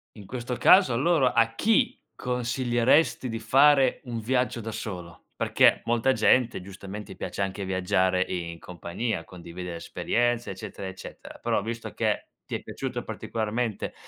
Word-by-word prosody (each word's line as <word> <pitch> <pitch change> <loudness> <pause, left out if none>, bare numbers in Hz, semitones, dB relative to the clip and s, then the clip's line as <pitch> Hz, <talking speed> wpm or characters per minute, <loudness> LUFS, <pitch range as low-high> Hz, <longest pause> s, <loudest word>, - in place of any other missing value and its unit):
In 105 -3 -11
questo 125 +3 -4
caso, 185 -7 +6
allora, 135 +2 +3
a 115 0 +3
chi 220 - +2 0.2
consiglieresti 125 +2 +1
di 115 0 -3
fare 135 +4 +4
un 120 -2 -4
viaggio 125 +1 0
da 110 -1 -5
solo? 90 -6 -7
Perché - - +4
molta 120 +2 +2
gente, 125 -5 +3
giustamente, 100 +1 -9
piace - - -5
anche 100 +1 -2
viaggiare 95 0 +1
in 85 -2 -4
compagnia, 90 +3 -4
condividere 85 0 -8
esperienze, 120 +6 -1
eccetera, 95 0 -7
eccetera; 95 - -11
però, - - +1
visto 115 +2 -5
che - - 0 0.2
ti - - -4
è - - -4
piaciuto - - -5
particolarmente 110 0 -3
115 Hz, 140 wpm, -26 LUFS, 95-125 Hz, 0.2 s, caso